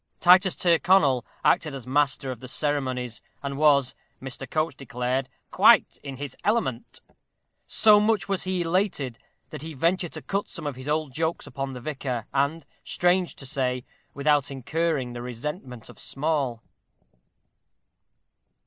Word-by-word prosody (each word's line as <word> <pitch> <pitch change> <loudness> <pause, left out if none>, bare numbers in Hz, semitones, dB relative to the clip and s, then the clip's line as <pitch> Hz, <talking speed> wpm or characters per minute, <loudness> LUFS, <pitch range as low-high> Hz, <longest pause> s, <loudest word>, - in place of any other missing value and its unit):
Titus 185 +1 +6
Tyrconnel 165 -7 +4 0.2
acted 150 -3 +3
as 130 -4 -8
master 135 0 +1
of 125 - -7
the 130 - -9
ceremonies, 130 -4 -2 0.2
and 140 0 -3
was, 140 -3 +4 0.3
Mr. 130 0 -7
Coates 155 0 0
declared, 130 0 -2 0.2
"quite - - +5
in 135 -2 -7
his 140 -1 -6
element." 130 - -1 0.7
So 210 -1 +6
much 210 -3 +1
was 195 -2 -1
he 185 -1 0
elated, 165 - -1 0.3
that - - -7
he 160 0 -7
ventured 170 +4 0
to - - -8
cut 200 +1 -2
some - - -8
of 145 -3 -3
his 130 +3 -7
old 150 -3 -1
jokes 160 +3 -1
upon 135 -1 -5
the 125 - -8
vicar, 130 -4 -3
and, 140 +4 0 0.2
strange 180 0 +1
to 135 - -9
say, 125 -2 -1 0.3
without 145 0 +2
incurring 140 -1 -1
the 120 - -6
resentment 125 - -6
of - - -14
Small. 135 -5 -1
140 Hz, 145 wpm, -26 LUFS, 130-165 Hz, 0.7 s, Titus